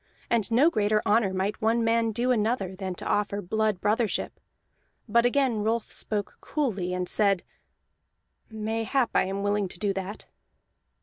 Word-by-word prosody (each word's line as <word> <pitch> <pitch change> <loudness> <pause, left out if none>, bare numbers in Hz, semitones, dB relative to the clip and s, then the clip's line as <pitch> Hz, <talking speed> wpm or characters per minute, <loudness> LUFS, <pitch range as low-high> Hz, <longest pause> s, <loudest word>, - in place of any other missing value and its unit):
And 230 -4 +2
no 265 +9 +4
greater 215 -2 +1
honor 210 -2 +3
might 190 +3 -2
one 225 +2 +2
man 230 0 +2
do 240 +4 +1
another 215 -4 0
than 185 -1 -4
to - - -8
offer 205 0 0
blood 215 +1 0
brothership. 215 +2 0 0.8
But 235 +2 +4
again 255 -3 +1
Rolf 225 +1 -1
spoke 205 -2 -2
coolly, 205 - -2
and 180 0 -2
said: 200 -3 +2 1.1
"Mayhap 225 +3 -1
I - - +3
am 195 +1 -3
willing 205 -1 +1
to 175 - -10
do 200 +1 0
that." 195 +2 -6
215 Hz, 150 wpm, -27 LUFS, 200-230 Hz, 1.1 s, no